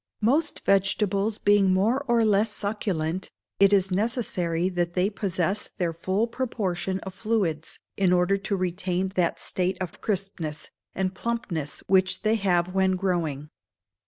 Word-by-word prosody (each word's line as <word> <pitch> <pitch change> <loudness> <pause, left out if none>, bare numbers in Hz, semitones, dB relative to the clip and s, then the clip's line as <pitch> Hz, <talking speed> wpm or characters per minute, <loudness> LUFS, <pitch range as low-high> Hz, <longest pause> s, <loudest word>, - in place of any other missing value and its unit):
Most 295 +7 +2
vegetables 195 +2 +1
being 205 -2 +4
more 220 +9 +2
or 235 -2 +3
less 210 +1 +3
succulent, 190 -5 -2 0.3
it 200 0 +6
is 195 -1 +3
necessary 185 -5 0
that 175 -2 -2
they 190 +3 +2
possess 190 -1 -1
their 175 -4 0
full 185 +6 0
proportion 195 -7 -2
of 190 - -7
fluids 190 -8 -1 0.2
in 190 -2 +3
order 180 +2 +3
to 200 +1 -2
retain 185 0 -1
that 180 -3 0
state 185 0 -1
of 185 -3 -6
crispness 180 -7 -3 0.2
and 190 0 -1
plumpness 190 - -3
which 190 0 +2
they 215 0 +3
have 185 -4 +1
when 190 -1 +2
growing. 165 -6 -2
190 Hz, 140 wpm, -26 LUFS, 180-205 Hz, 0.3 s, it